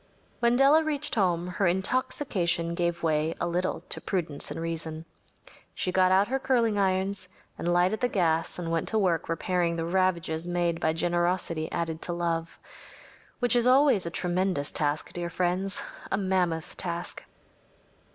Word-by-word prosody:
When 235 0 +3
Della 280 +5 +5
reached 300 -2 -1
home 175 -5 +1
her 180 +2 0
intoxication 185 - 0
gave 170 0 -1
way 155 0 +1
a - - 0
little 180 +2 -1
to - - -3
prudence 160 -7 -3
and 145 +3 -5
reason. 165 -1 -4 0.7
She 180 - -1
got 185 0 +3
out 195 +2 +4
her 270 +2 -1
curling 235 -6 +1
irons 190 0 0 0.3
and 175 - -2
lighted 180 +5 +2
the 250 - +2
gas 165 -6 0
and 170 -2 -4
went 165 -1 0
to 220 - +2
work 175 -7 +1
repairing 170 +1 0
the 165 -1 -2
ravages 170 -2 0
made 175 -1 0
by 160 - +1
generosity 175 -1 0
added 165 -1 -3
to 175 - -3
love. 170 -1 -2 0.8
Which 245 -1 +2
is 240 0 +4
always 255 -8 +4
a - - -1
tremendous 180 -3 -1
task, 150 0 -1
dear 175 -1 -3
friends‚ÄĒa 185 +3 -1
mammoth 180 -4 0
task. 175 -1 -4
175 Hz, 155 wpm, -27 LUFS, 165-195 Hz, 0.8 s, Della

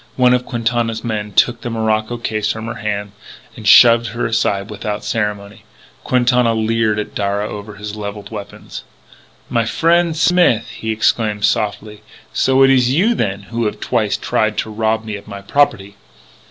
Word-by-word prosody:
One 125 -1 +4
of 125 0 0
Quintana's 115 -1 -1
men 105 -3 -3
took 120 +4 +2
the 120 - -4
morocco 110 0 -1
case 110 -2 -2
from 110 0 -6
her 115 - -4
hands 105 -1 -3 0.4
and 110 - -7
shoved 115 +2 +7
her 120 - -3
aside 105 -3 -1
without 105 0 -4
ceremony. 105 -2 -3 0.4
Quintana 125 -2 +2
leered 110 -1 +1
at 105 - -4
Darragh 100 +1 -2
over 105 0 -8
his 105 0 -7
levelled 105 0 -7
weapons: 105 -2 -8 0.6
"My 115 - 0
frien' 165 +7 +2
Smith!" 165 -8 +3
he 110 - -7
exclaimed 110 -1 +1
softly. 105 0 -2 0.3
"So 135 0 +3
it 135 - +6
is 125 -2 +3
you, 190 - +3
then, 100 - -2
who 115 0 -1
have - - -5
twice - - 0
try 110 - 0
to 110 +1 -4
rob 110 +1 -1
me 105 -2 -4
of 100 - -14
my 100 -1 -8
property! 100 -6 0
110 Hz, 165 wpm, -17 LUFS, 105-120 Hz, 0.6 s, shoved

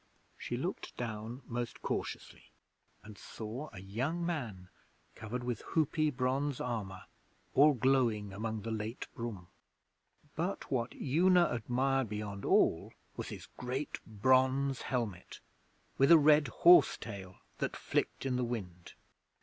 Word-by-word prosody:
She - - -4
looked - - -4
down 115 +2 -5
most 120 0 -5
cautiously, - - -4 0.5
and 105 -2 -12
saw 115 +7 -7
a 100 - -9
young 130 - -2
man 115 - -4 0.4
covered 120 +3 -5
with 120 -3 -3
hoopy 155 0 +1
bronze 130 +2 0
armour 105 -6 -4 0.5
all 150 +2 +6
glowing 115 -5 +2
among 110 +1 -4
the 115 - -4
late 110 +2 -4
broom. 105 -7 -6 0.9
But 175 +5 -3
what 120 -3 -1
Una 175 +5 +4
admired 125 +2 0
beyond 105 -2 -5
all - - +2 0.2
was - - -5
his - - -8
great 130 +4 -3
bronze 130 +4 +2
helmet 115 -8 -3 0.6
with 135 +3 +5
a 165 - +11
red 150 -1 +5
horse 175 +9 +6
tail 95 -4 -8 0.2
that - - -2
flicked - - -2
in 130 -2 0
the 125 - 0
wind. 95 -8 -5
120 Hz, 130 wpm, -33 LUFS, 105-135 Hz, 0.9 s, a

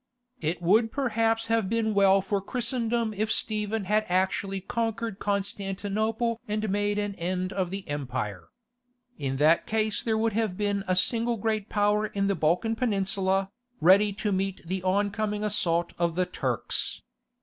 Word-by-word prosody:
It 170 -1 -2
would 220 +6 +4
perhaps 225 -4 +1
have 225 -4 +1
been 225 -1 +1
well 195 -1 +5
for 200 0 -1
Christendom 235 0 -1
if 215 +2 -1
Stephen 215 -1 0
had 210 +3 +2
actually 190 +1 0
conquered 225 +1 -3
Constantinople 205 +3 -1
and 215 +1 -1
made 205 +1 0
an 205 -1 -1
end 185 +2 -2
of 185 -3 -1
the 195 +1 -6
empire. 125 - -4 0.7
In 135 -2 -2
that 155 +4 +4
case 215 -1 0
there 220 -2 0
would 225 0 +1
have 215 -4 -1
been 205 -1 0
a 185 - +2
single 230 +5 +1
great 215 0 -1
power 210 +1 +2
in 200 -1 -1
the 200 - +2
Balkan 180 +7 +1
Peninsula, 195 -4 0 0.3
ready 200 +5 +5
to 205 +2 -2
meet 195 -2 -2
the 185 +2 -2
oncoming 205 +2 0
assault 175 -5 0
of 170 -1 +1
the 185 +1 +2
Turks. - - -2
205 Hz, 155 wpm, -27 LUFS, 190-220 Hz, 0.7 s, well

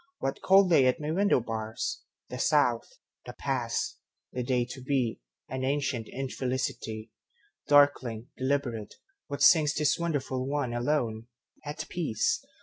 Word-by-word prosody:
What 135 - -3
call 195 0 +6
they 145 -7 +5
at 125 - +2
my 150 0 -3
window 200 -2 +3
bars? 110 -1 -4 0.3
The 125 - -6
South, 125 -6 +2 0.4
the - - -6
past, - - -2 0.3
the 125 - -2
day 125 -1 +1
to 130 +2 -9
be, 130 - -1 0.3
An 130 0 -4
ancient 135 -4 -1
infelicity. 125 -4 -3 0.6
Darkling, 135 -6 +3
deliberate, 130 -5 -2 0.3
what 140 - -5
singsThis 150 -2 +4
wonderful 135 -6 -2
one, 140 -4 -1
alone, 120 -3 -1 0.4
at 145 0 -5
peace? 320 - 0
130 Hz, 130 wpm, -29 LUFS, 120-145 Hz, 0.6 s, call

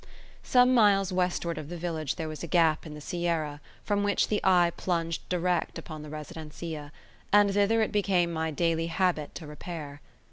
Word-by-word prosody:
Some 250 0 +4
miles 200 -5 +4
westward 175 -3 0
of 150 -1 -8
the 175 - -5
village 160 -4 -2
there 160 -2 -4
was 155 -2 -6
a 170 - -4
gap 160 -1 +2
in 150 - -8
the 150 - -9
sierra, 165 -4 -2 0.2
from 205 -1 0
which 205 0 +1
the 210 - +1
eye 175 -2 +5
plunged 165 -2 -2
direct 180 0 0
upon 155 -3 -8
the 150 - -9
residencia; 155 0 -7 0.4
and 205 -1 +5
thither 210 +3 +3
it - - -2
became 185 -5 +1
my 160 0 -1
daily 165 +1 0
habit 170 -3 0
to 165 - -7
repair. 150 -1 -8
170 Hz, 180 wpm, -28 LUFS, 155-190 Hz, 0.4 s, eye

